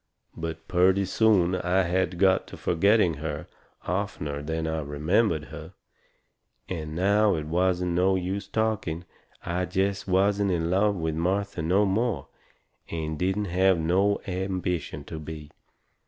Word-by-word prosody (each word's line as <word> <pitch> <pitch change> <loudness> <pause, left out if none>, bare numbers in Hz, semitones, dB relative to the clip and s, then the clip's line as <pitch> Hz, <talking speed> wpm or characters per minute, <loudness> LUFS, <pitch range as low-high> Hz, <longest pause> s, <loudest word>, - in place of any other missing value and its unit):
But 80 0 -6
purty 95 +2 +3
soon 95 -3 +3
I 90 +1 +1
had 90 0 0
got 95 0 +3
to - - -10
forgetting 90 -1 +3
her 75 0 -4 0.4
oftener 70 -1 -3
than 80 +2 -3
I 80 0 -1
remembered 80 +4 +1
her. - - -9 0.9
And 80 -4 -5
now 100 +3 +3
it 75 -2 -3
wasn't 90 +2 +1
no 90 +2 +3
use 95 +2 -3
talking 100 -6 -1 0.4
I 90 +1 -1
jest 95 +2 -1
wasn't 100 +2 +2
in 85 -2 0
love 100 +2 +3
with 80 -3 -2
Martha 95 +3 -1
no 95 +6 +3
more, 110 +3 -1 0.6
and 80 -2 -4
didn't 95 +3 0
have 95 0 +4
no 95 +5 +2
ambition 90 -5 -3
to 80 +2 -7
be. 75 -1 -8
90 Hz, 140 wpm, -26 LUFS, 80-100 Hz, 0.9 s, have